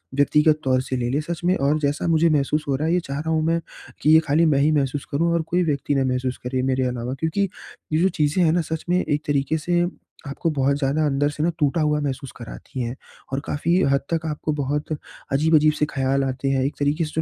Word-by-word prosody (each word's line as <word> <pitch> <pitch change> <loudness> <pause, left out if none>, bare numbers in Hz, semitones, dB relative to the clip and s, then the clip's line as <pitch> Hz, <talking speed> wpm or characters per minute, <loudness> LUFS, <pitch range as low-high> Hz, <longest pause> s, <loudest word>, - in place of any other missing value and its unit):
व्यक्तिगत 150 +2 +3
तौर 130 -1 +2
से 130 0 -4
ले, 120 -1 -1
ले। 140 +4 0
सच 170 +2 -5
में 185 +2 +3
और 145 +3 +1
जैसा 145 +2 -1
मुझे 165 0 +3
महसूस 150 +1 +1
हो 140 - +1
रहा 155 +4 -1
है 170 - +2
ये 180 - +3
चाह 140 -4 -5
रहा 160 +2 -4
हूँ 160 -1 +2
मैं 165 +1 +2 0.4
कि 150 - +2
ये 160 - +8
खाली 155 +4 +3
मैं 145 -4 +3
ही 150 +2 +3
महसूस 140 -1 0
करूँ 165 +4 +1
और 170 - +1
कोई 180 +1 +2
व्यक्ति 145 -2 -1
ना 135 - +2
महसूस 125 0 -2
करे 130 0 -1
मेरे 130 0 +1
अलावा। 125 0 -3
क्योंकि 180 +5 0 0.4
ये 160 - +3
जो 190 - +4
चीज़ें 150 +5 +2
हैं 160 - +4
ना 175 - +2
सच 160 0 -5
में 180 +1 +3
एक 150 0 -1
तरीक़े 145 +2 +1
से 175 +2 0 0.5
आपको 140 +4 -2
बहुत 140 -1 +1
ज़्यादा 145 +2 +1
अंदर 145 0 +1
से 150 +1 -3
ना 170 - +3
टूटा 155 +2 +1
हुआ 150 0 +2
महसूस 135 -2 -4
कराती 125 +2 -8
हैं। 120 +1 -3 0.4
और 135 - +1
काफ़ी 165 +4 0 0.2
हद 140 - +2
तक 165 0 -1
आपको 155 0 -2
बहुत 145 +2 -2 0.4
अजीब-अजीब 155 +1 +4
से 150 - 0
ख़्याल 135 0 +1
आते 135 +1 -2
हैं। 135 -1 +1
एक 140 - -2
तरीक़े 150 +3 +1
से 155 +1 -2
150 Hz, 245 wpm, -23 LUFS, 135-160 Hz, 0.5 s, ये